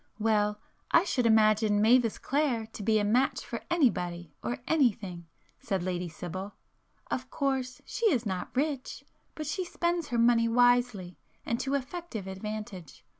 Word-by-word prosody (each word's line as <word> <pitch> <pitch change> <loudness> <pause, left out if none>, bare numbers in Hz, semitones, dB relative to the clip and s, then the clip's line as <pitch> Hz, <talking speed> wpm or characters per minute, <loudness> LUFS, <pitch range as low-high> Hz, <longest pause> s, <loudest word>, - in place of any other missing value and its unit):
"Well, 210 -1 +1 0.3
I 335 - +5
should 255 -10 +1
imagine 215 -1 +4
Mavis 230 +1 +4
Clare 270 -5 0
to - - -7
be 215 +2 +2
a 210 - +1
match 245 +6 +1
for - - -5
anybody 175 - 0
or 245 - -3
anything,"—said 195 - -2
Lady 180 -1 -2
Sibyl—"Of 190 +8 -8
course 265 -3 -2
she 465 - 0
is 245 -6 0
not 185 -3 -3
rich,—but 290 +2 -4
she 335 +6 -2
spends 345 -2 -1
her 240 - -2
money 230 0 +4
wisely 245 -6 +2 0.3
and 235 - -1
to 275 +1 -1
effective 280 - -5
advantage. 190 -4 -7
230 Hz, 135 wpm, -29 LUFS, 200-265 Hz, 0.3 s, I